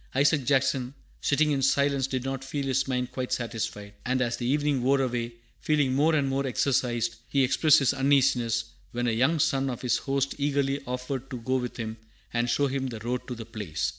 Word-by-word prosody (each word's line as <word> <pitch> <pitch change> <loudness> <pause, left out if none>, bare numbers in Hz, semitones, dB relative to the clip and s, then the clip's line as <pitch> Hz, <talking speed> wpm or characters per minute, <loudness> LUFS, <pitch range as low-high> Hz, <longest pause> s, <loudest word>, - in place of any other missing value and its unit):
Isaac 140 0 +3
Jackson, 130 -1 +1 0.3
sitting 150 +1 +2
in 140 -2 +1
silence, 140 0 +2
did 130 -2 -2
not 135 0 -3
feel 140 +1 -3
his 135 0 +1
mind 125 -1 -1
quite 130 -1 -4
satisfied; 110 -3 -3
and 130 +1 0
as 120 -1 0
the 120 - -3
evening 145 -1 +1
wore 135 +3 +3
away, 120 -2 -1 0.3
feeling 145 -4 +1
more 155 +4 +3
and 140 -3 +2
more 135 0 0
exercised, 120 -2 0
he 140 -1 +3
expressed 150 +4 +5
his 135 -1 +3
uneasiness, 135 -4 +2 0.3
when 120 0 -1
a 120 - +2
young 130 +9 +2
son 135 -2 +1
of 125 -1 -5
his 125 -2 +2
host 140 0 -1
eagerly 140 -1 0
offered 125 +1 -4
to 130 - -5
go 130 +3 0
with 125 -1 -4
him 110 -1 -4 0.4
and 120 +1 +1
show 145 - +2
him 135 -1 -1
the 120 -3 -5
road 125 +2 -3
to 125 - -4
the 115 -1 -8
place. 105 -8 -3
130 Hz, 205 wpm, -27 LUFS, 120-140 Hz, 0.4 s, expressed